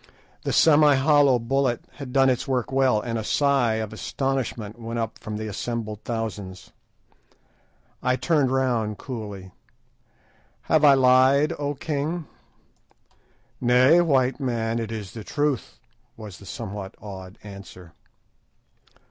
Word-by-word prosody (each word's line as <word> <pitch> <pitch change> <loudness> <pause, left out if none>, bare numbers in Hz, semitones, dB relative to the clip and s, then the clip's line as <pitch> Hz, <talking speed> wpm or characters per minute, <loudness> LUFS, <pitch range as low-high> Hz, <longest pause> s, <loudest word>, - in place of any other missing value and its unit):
The - - -2
semi 150 -2 +5
hollow 140 -1 +4
bullet 125 +1 -1
had 140 -3 -7
done 135 0 +4
its 125 - -2
work 130 -2 -1
well, 130 -4 +3
and 115 +1 -3
a - - -4
sigh 135 -2 +2
of 110 -1 -4
astonishment 120 -3 -3
went 115 0 -5
up 115 -1 -3
from 110 -2 -6
the 110 - -5
assembled 110 0 -4
thousands. 105 -5 -5 1.3
I 125 0 +1
turned 145 -2 +1
round 120 -5 0
coolly— 105 -7 -7 1.1
"Have 155 -1 +2
I 140 -2 +8
lied, 130 +4 +4
O 145 0 -2
king?" 155 +3 -3 1.4
"Nay, 130 +7 +5
white 135 -6 +2
man, 115 -3 -1
it 115 -1 -4
is 105 -4 -6
the 110 - -8
truth," 145 +1 -2 0.4
was 105 -5 -10
the 100 - -13
somewhat 100 -3 -7
awed 95 -1 -9
answer. 100 -4 -12
120 Hz, 130 wpm, -24 LUFS, 110-135 Hz, 1.4 s, I